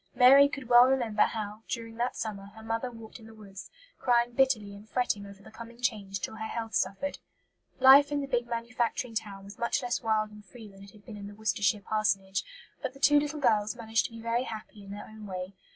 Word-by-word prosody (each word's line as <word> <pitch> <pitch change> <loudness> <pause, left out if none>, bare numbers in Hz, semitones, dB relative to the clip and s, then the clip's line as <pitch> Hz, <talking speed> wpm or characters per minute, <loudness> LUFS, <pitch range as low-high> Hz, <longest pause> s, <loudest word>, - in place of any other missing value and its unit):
Mary 270 +3 +8
could 275 -3 -7
well 240 0 +8
remember 240 -5 +1
how, 215 -1 -1
during 230 -1 -5
that 245 +1 -1
summer, 200 -3 -5
her 220 - -12
mother 225 +3 -2
walked 225 -1 -11
in 225 - -14
the 225 - -14
woods, 200 -2 -11 0.3
crying 240 -1 +2
bitterly 240 -6 +1
and 205 +2 -13
fretting 210 -5 -1
over 200 0 -14
the - - -14
coming 235 +1 -11
change 205 -5 -2
till 220 - -5
her 220 - -4
health 225 -1 -5
suffered. 195 +10 -1 0.6
Life 275 +2 +8
in 290 - 0
the 280 - -2
big 245 -3 -1
manufacturing 235 +1 -2
town 205 -3 -5
was 200 +1 -12
much 235 +3 0
less 245 -1 -1
wild 215 -2 0
and 210 0 -13
free 220 +3 -13
than 195 -1 -15
it 200 - -13
had 205 0 -19
been 220 -4 -9
in 200 0 -8
the 205 - -11
Worcestershire 205 -1 0
parsonage; 195 -2 0 0.4
but 265 -1 -4
the - - -13
two 290 +1 +5
little 295 +1 -3
girls 215 -5 +2
managed 225 -1 0
to - - -5
be 230 - -10
very 230 +2 -1
happy 215 -2 -9
in 195 - -12
their 205 +1 -7
own 215 -1 -11
way. 185 0 -6
225 Hz, 230 wpm, -29 LUFS, 205-245 Hz, 0.6 s, Mary